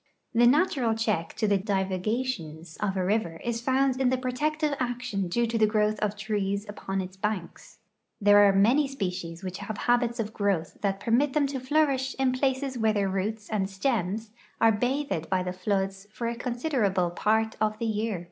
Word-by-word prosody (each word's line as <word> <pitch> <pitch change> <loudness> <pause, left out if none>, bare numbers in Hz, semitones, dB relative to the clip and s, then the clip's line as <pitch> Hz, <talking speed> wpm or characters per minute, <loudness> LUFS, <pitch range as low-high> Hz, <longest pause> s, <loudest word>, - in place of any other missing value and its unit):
The 240 +1 +5
natural 265 -5 +3
check 210 -7 -1
to 215 - 0
the 200 -1 +3
divagations 190 -4 -2
of 195 -2 -1
a 185 - 0
river 185 -5 0
is 235 -1 -2
found 265 +1 +1
in 255 - +4
the 260 - +1
protective 295 +4 -1
action 245 -6 -2
due 235 +7 +1
to 230 0 -1
the 215 - +5
growth 215 0 +1
of 210 -1 -1
trees 205 -1 -2
upon 195 -2 -3
its 185 0 -7
banks. 200 -3 -4 0.4
There 205 0 +6
are 205 -1 +7
many 235 +10 +4
species 180 -8 -4
which 185 -1 -5
have 205 +1 -5
habits 240 0 +1
of 220 -1 -3
growth 195 -6 -1
that 195 -1 0
permit 255 +6 +2
them 300 -2 +3
to 275 -1 -3
flourish 270 -1 +1
in 265 -1 +2
places 260 0 -1
where 220 -1 +3
their 200 -2 +1
roots 205 +3 -2
and 195 -3 -1
stems 210 0 -1 0.3
are 225 - +6
bathed 245 - -1
by 185 -1 +1
the 180 0 -3
floods 195 +1 -2
for 230 +2 -4
a 235 - -1
considerable 240 - 0
part 220 +4 +1
of 215 0 +1
the 230 - -3
year. 215 -3 -1
215 Hz, 185 wpm, -27 LUFS, 195-250 Hz, 0.4 s, are